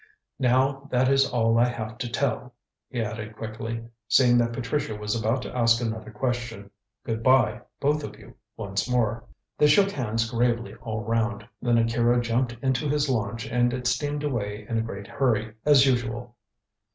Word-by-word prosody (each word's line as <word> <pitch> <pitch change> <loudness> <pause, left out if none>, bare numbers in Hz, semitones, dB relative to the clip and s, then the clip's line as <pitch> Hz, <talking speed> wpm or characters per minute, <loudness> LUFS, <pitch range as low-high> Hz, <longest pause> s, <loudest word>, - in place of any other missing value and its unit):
Now 135 +2 +2
that 125 0 +2
is 135 0 +4
all 115 -3 +2
I 120 - +5
have 115 -1 -5
to 120 - -3
tell," 125 0 -2 0.3
he 125 - -2
added 110 0 -6
quickly, 115 +1 -5 0.2
seeing 120 -1 +5
that 120 0 +1
Patricia 125 0 -2
was 105 0 -3
about 115 +3 0
to - - -7
ask 115 -1 +4
another 110 -2 -4
question. 115 -3 -3 0.3
"Good 115 -1 -2
bye, 120 -2 +3 0.2
both 150 +1 +1
of - - -7
you, - - -14 0.2
once 100 +4 -2
more." 120 -1 0 0.3
They 150 - +6
shook 195 +7 +5
hands 115 - -1
gravely 120 0 0
all 110 -2 -4
round, 115 -1 -1
then 120 -1 +2
Akira 115 +1 +3
jumped 120 +1 0
into 130 +2 +1
his 145 0 +1
launch 115 -1 -2
and 120 +1 +1
it 125 -1 -6
steamed 145 +4 0
away 105 -7 -3
in 115 - -1
a - - +2
great 100 -3 -6
hurry, 110 -3 0
as 140 -2 +7
usual. 120 -2 -1
120 Hz, 175 wpm, -26 LUFS, 115-130 Hz, 0.3 s, as